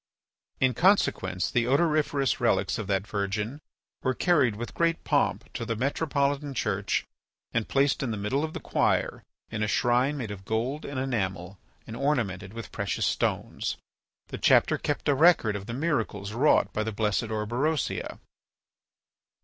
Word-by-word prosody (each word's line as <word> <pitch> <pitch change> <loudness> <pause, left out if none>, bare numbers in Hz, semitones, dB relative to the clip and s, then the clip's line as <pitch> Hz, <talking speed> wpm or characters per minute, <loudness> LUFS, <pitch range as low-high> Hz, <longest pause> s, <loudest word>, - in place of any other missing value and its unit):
In 130 -1 +3
consequence, 110 - +2
the 120 -1 +1
odoriferous 145 -3 +2
relics - - +1
of 105 - -4
that 95 0 0
virgin 105 +7 -3 0.4
were 130 -1 0
carried 140 -11 +3
with 120 +3 -6
great 165 0 0
pomp - - 0
to - - -4
the 115 0 -2
metropolitan 140 +2 -1
church - - -1 0.5
and 115 -2 0
placed 135 0 +2
in 135 - -1
the 110 - -2
middle 105 +9 -1
of 160 0 -3
the - - -4
choir - - 0 0.3
in 110 -1 -3
a 105 - +1
shrine 125 +6 +2
made 115 -6 -4
of 95 -2 -8
gold 120 +8 -2
and 140 -2 -4
enamel 95 -8 -3 0.3
and 110 - -8
ornamented 115 -9 -1
with 115 -1 -8
precious - - -1
stones. - - -1 0.5
The - - -6
chapter - - +4
kept 145 - -2
a 145 - +5
record 140 -8 +4
of 100 0 -6
the 115 - -4
miracles 110 - -1
wrought 140 +6 +3
by 110 - -1
the 110 +1 -2
blessed 105 +1 0
Orberosia. 120 +8 -1
120 Hz, 155 wpm, -27 LUFS, 105-140 Hz, 0.5 s, a